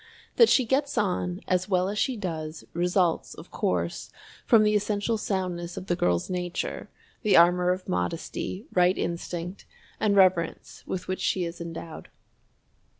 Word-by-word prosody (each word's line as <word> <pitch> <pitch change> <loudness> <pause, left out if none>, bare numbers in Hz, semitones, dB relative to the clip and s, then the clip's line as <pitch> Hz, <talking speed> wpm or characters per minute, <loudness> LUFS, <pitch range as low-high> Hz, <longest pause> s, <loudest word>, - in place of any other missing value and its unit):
That 465 - +7
she 260 - +4
gets 275 +4 0
on 180 -2 0
as 185 +1 0
well 185 -1 +2
as 205 +1 -2
she 260 -3 0
does, 160 -5 -5
results, 175 0 +1
of - - -12
course, 85 -1 -2 0.4
from 225 -3 +6
the 210 0 +3
essential 210 +2 0
soundness 180 -5 -3
of - - -5
the 175 - 0
girl's 90 - +1
nature, 180 -1 -4 0.3
the 215 -4 +4
armor 180 +1 +5
of 185 +1 -1
modesty, 165 - -3
right 180 +1 +4
instinct, 175 +2 -4 0.3
and 205 -2 +2
reverence 185 -4 +2
with 185 - -4
which 185 - -3
she 180 -2 +1
is 170 0 -7
endowed. 165 -1 -8
180 Hz, 150 wpm, -27 LUFS, 170-200 Hz, 0.4 s, That